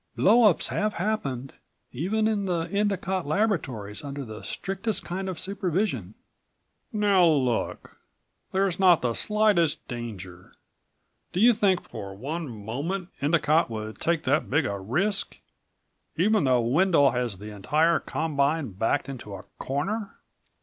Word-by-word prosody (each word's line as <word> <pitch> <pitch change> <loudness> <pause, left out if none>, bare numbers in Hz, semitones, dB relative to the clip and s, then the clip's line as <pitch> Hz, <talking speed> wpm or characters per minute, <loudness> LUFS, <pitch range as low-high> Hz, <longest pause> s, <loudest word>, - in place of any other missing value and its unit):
Blowups 215 -2 +5
have 215 0 -1
happened... 140 - -2 0.4
even 200 - 0
in 210 -2 0
the 175 -3 0
Endicott 190 -4 0
Laboratories 145 - -1
under 140 -1 -5
the 110 -1 -8
strictest 195 +3 -3
kind 190 +2 -3
of 185 - -5
supervision." 180 - -2 0.8
"Now 200 -4 +4
look. 130 -7 0 0.5
There's 190 -2 +1
not 180 -6 +5
the 120 -2 +1
slightest 210 - +1
danger. 95 -7 -8 0.8
Do 180 - -1
you 240 +4 +7
think 195 -4 +2
for 100 -3 -7
one 150 +8 -4
moment 140 - -4
Endicott 155 +1 +3
would 110 -1 -6
take 165 -1 +1
that 145 +4 +1
big 145 +2 +2
a 100 -1 -2
risk 175 - 0 0.8
even 205 0 +3
though 125 -2 +3
Wendel 145 +3 +4
has 120 -4 -2
the 105 +3 -9
entire 155 - +2
combine 145 -3 -1
backed 110 +6 0
into 120 -7 -7
a 95 - -9 0.2
corner?" 195 +10 -3
160 Hz, 130 wpm, -26 LUFS, 120-195 Hz, 0.8 s, you